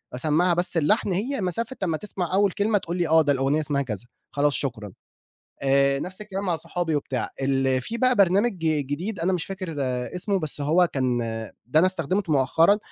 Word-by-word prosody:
أسمعها 160 Hz, +6 st, +2 dB
بس 175 Hz, 0 st, 0 dB
اللحن 200 Hz, +6 st, +2 dB
هي 235 Hz, +7 st, -2 dB
مسافة 225 Hz, +7 st, -2 dB
أمّا 165 Hz, -4 st, 0 dB
تسمع 185 Hz, -2 st, -4 dB
أول 200 Hz, 0 st, +3 dB
كلمة، 205 Hz, +3 st, +1 dB
تقول 175 Hz, -2 st, -4 dB
لي 175 Hz, -2 st, +1 dB
آه، 160 Hz, +1 st, +5 dB
ده 145 Hz, -2 st, +2 dB
الأغنية 135 Hz, +3 st, +1 dB
اسمها 145 Hz, -2 st, 0 dB
كذا 115 Hz, -5 st, -5 dB, 0.3 s
خلاص 145 Hz, 0 st, +1 dB
شكرًا. 110 Hz, -8 st, -3 dB, 0.7 s
آآ، 140 Hz, 0 st, +3 dB
نَفْس 185 Hz, +7 st, -7 dB
الكلام 200 Hz, -2 st, -5 dB
مع 175 Hz, -4 st, 0 dB
صحابي 165 Hz, 0 st, -2 dB
وبتاع 135 Hz, -3 st, -3 dB
ال 135 Hz, -1 st, +1 dB
في 225 Hz, -, -4 dB
بقى 255 Hz, +1 st, +4 dB
برنامج 200 Hz, +4 st, +4 dB
جديد 160 Hz, +5 st, -2 dB
أنا 180 Hz, +3 st, +1 dB
مش 175 Hz, -3 st, -1 dB
فاكر 185 Hz, -4 st, -6 dB, 0.4 s
اسمه 195 Hz, +2 st, 0 dB
بس 155 Hz, -4 st, -2 dB
هو 160 Hz, +5 st, +3 dB
كان 130 Hz, -3 st, 0 dB, 0.5 s
ده 125 Hz, +6 st, +2 dB
أنا 175 Hz, -, +5 dB
استخدمته 185 Hz, 0 st, -1 dB
مؤخرًا 160 Hz, +8 st, +4 dB
165 Hz, 185 wpm, -24 LUFS, 140-190 Hz, 0.7 s, آه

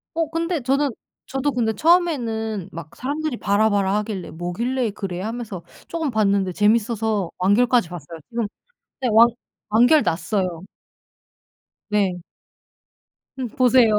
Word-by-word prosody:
어 330 Hz, 0 st, +1 dB
근데 330 Hz, 0 st, -1 dB
저는 275 Hz, +3 st, +1 dB, 0.4 s
저도 270 Hz, +2 st, -1 dB
근데 230 Hz, -4 st, 0 dB
처음에는 230 Hz, -, +1 dB
막 165 Hz, -2 st, -9 dB
사람들이 290 Hz, 0 st, -3 dB
"봐라봐라." 200 Hz, -1 st, +2 dB
하길래 210 Hz, -4 st, -4 dB
뭐길래 225 Hz, +9 st, -2 dB
그래 190 Hz, -3 st, -5 dB
하면서 220 Hz, -4 st, -5 dB, 0.2 s
쪼금 325 Hz, -3 st, -2 dB
봤는데 200 Hz, -5 st, +1 dB
재밌어서 215 Hz, -2 st, +1 dB
완결까지 225 Hz, +2 st, +3 dB
봤어요. 165 Hz, -1 st, -8 dB
지금 230 Hz, -2 st, -2 dB, 0.5 s
네 255 Hz, -, +1 dB
완 225 Hz, +2 st, +8 dB, 0.4 s
완결 245 Hz, +8 st, +5 dB
났어요. 170 Hz, +1 st, -1 dB, 1.3 s
네. 200 Hz, -4 st, +1 dB, 1.2 s
음 255 Hz, -, -2 dB
보세요. 250 Hz, -3 st, +4 dB
220 Hz, 270 characters per minute, -22 LUFS, 195-255 Hz, 1.3 s, 완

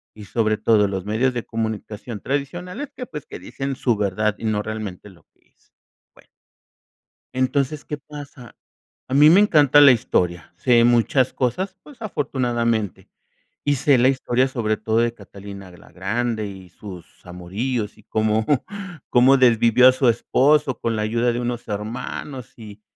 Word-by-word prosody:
y, 105 Hz, -1 st, -11 dB
sobre 110 Hz, +1 st, 0 dB
todo, 105 Hz, -2 st, +3 dB
los 95 Hz, -2 st, -4 dB
medios 115 Hz, +5 st, 0 dB
de 120 Hz, -2 st, -3 dB
comunicación 110 Hz, -1 st, -5 dB
tradicionales, 175 Hz, -, -4 dB
que, 250 Hz, -, -6 dB
pues, 150 Hz, -, -8 dB
que -, -, -9 dB
dicen 135 Hz, 0 st, -5 dB
su 120 Hz, -3 st, 0 dB
verdad, 105 Hz, +1 st, 0 dB
y -, -, -7 dB
no 105 Hz, -1 st, 0 dB
realmente 105 Hz, -2 st, -6 dB
lo 90 Hz, -4 st, -20 dB
que -, -, -36 dB
es. -, -, -38 dB, 0.4 s
Bueno -, -, -22 dB, 1.1 s
entonces, 140 Hz, +3 st, -1 dB
¿qué 150 Hz, -, -5 dB
pasa? 145 Hz, -4 st, -12 dB, 0.5 s
A 130 Hz, -, -3 dB
mí 150 Hz, +2 st, +7 dB
me 185 Hz, +4 st, +7 dB
encanta 150 Hz, -8 st, +5 dB
la 140 Hz, -2 st, +9 dB
historia, 90 Hz, -8 st, -1 dB
sé 120 Hz, +4 st, +3 dB
muchas 120 Hz, +2 st, +3 dB
cosas, 185 Hz, +10 st, -2 dB
pues, 290 Hz, -5 st, -16 dB
afortunadamente. 120 Hz, -, -2 dB, 0.6 s
Y 145 Hz, 0 st, +2 dB
sé 140 Hz, 0 st, +3 dB
la 125 Hz, +1 st, +4 dB
historia, 130 Hz, -1 st, +1 dB
sobre 110 Hz, -5 st, -1 dB
todo, 110 Hz, +1 st, -1 dB
de 120 Hz, 0 st, +1 dB
Catalina 100 Hz, -2 st, -11 dB
la 90 Hz, -, -17 dB
Grande 110 Hz, +3 st, -2 dB
y 95 Hz, -2 st, -11 dB
sus 90 Hz, -2 st, -12 dB
amoríos, 105 Hz, +6 st, -4 dB
y 110 Hz, -, -19 dB
cómo 110 Hz, +1 st, 0 dB, 0.6 s
cómo 130 Hz, +2 st, +5 dB
desvivió 120 Hz, 0 st, +5 dB
a -, -, +3 dB
su 130 Hz, -1 st, +2 dB
esposo, 135 Hz, +4 st, +2 dB
con 115 Hz, -1 st, -1 dB
la 105 Hz, -, -1 dB
ayuda 115 Hz, +3 st, +1 dB
de 120 Hz, -, -2 dB
unos 120 Hz, 0 st, -4 dB
hermanos, 115 Hz, +5 st, -6 dB
y 105 Hz, -2 st, -12 dB
120 Hz, 160 wpm, -22 LUFS, 105-135 Hz, 1.1 s, la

